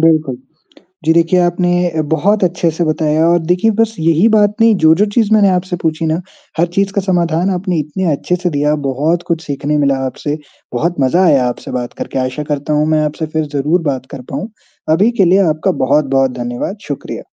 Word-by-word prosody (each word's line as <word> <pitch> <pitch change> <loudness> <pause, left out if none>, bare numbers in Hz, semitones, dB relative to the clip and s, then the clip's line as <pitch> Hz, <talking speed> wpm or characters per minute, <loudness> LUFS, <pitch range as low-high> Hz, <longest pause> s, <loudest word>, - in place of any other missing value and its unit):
बिल्कुल। 155 -5 +2 0.7
जी, 160 - +4
देखिए 170 +2 +3
आपने 175 -2 +1
बहुत 195 +6 +2
अच्छे 175 -1 0
से 165 +2 -2
बताया। 155 0 +1
और 175 0 +4
देखिए 180 +5 +2
बस 225 -1 +1
यही 165 +6 +3
बात 210 -2 +3
नहीं, 225 -1 +5
जो-जो 160 +4 +4
चीज़ 220 -3 +2
मैंने 205 -2 +5
आपसे 180 0 -1
पूछी 160 0 -1
ना, 160 +2 0 0.4
हर 170 - +3
चीज़ 195 0 +1
का 200 - 0
समाधान 175 -1 0
आपने 180 -2 -1
इतने 155 +4 -2
अच्छे 180 +5 -1
से 180 0 -2
दिया। 150 0 +1
बहुत 155 +6 0
कुछ 165 -2 -1
सीखने 145 +1 -2
मिला 140 -2 +2
आपसे, 145 +4 -4 0.4
बहुत 170 +8 0
मज़ा 170 +8 +3
आया 135 -6 +3
आपसे 120 - -5
बात 125 -1 -4
करके। - - -4
आशा 130 +3 -2
करता 145 +1 -2
हूँ 150 +1 +2
मैं 155 -1 +2
आपसे 150 +1 -3
फ़िर 155 0 -2
ज़रूर 155 +6 +1
बात 130 -1 -5
कर 135 -3 -8
पाऊँ, 205 - -4 0.4
अभी 195 +9 +4
के - - +6
लिए 180 +3 +4
आपका 155 +5 0
बहुत-बहुत 135 -1 +2
धन्यवाद। 120 - -4
शुक्रिया। 145 - -5
160 Hz, 195 wpm, -15 LUFS, 150-180 Hz, 0.7 s, के